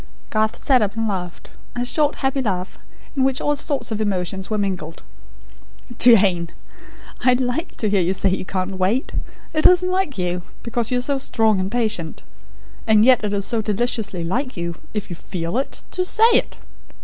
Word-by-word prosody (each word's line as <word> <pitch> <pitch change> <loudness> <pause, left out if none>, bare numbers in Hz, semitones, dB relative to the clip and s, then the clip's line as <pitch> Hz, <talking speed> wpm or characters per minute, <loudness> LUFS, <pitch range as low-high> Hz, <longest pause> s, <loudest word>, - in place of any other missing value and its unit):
Garth 215 0 +1
sat 260 -3 +3
up, 205 0 -1
and 225 0 0
laughed 180 -4 -5 0.2
a 245 0 -1
short 295 +3 +1
happy 270 0 -1
laugh, 185 -6 -3 0.4
in 270 - +2
which 265 +1 +1
all 295 -1 +1
sorts 275 -5 -2
of 220 0 -2
emotions 190 -2 -2
were 215 - 0
mingled. 185 -6 -3 1.0
"Jane! 190 -8 +5 0.7
I 250 0 +5
like 250 +6 -2
to 220 - 0
hear 200 -2 +2
you 180 +2 +1
say 195 - +2
you 190 - -1
can't 185 0 -3
wait. 205 +8 +1 0.4
It 310 -1 +6
isn't 365 0 +4
like 370 - 0
you; 180 -1 -1 0.2
because 235 -1 -2
you 250 - +1
are - - 0
so 275 +2 0
strong 220 -6 +1
and 185 +1 -2
patient. 215 -9 -2 0.6
And 215 0 +5
yet 255 -3 +5
it 210 - -1
is 200 -1 -1
so 230 -2 0
deliciously 210 -4 -1
like 250 +8 -2
you, 170 0 -3 0.2
if 205 -2 -3
you - - -4
FEEL 170 0 -5
it, 275 - -5
to 365 - -1
SAY 445 +5 +4
it. - - +1
215 Hz, 185 wpm, -21 LUFS, 190-255 Hz, 1.0 s, It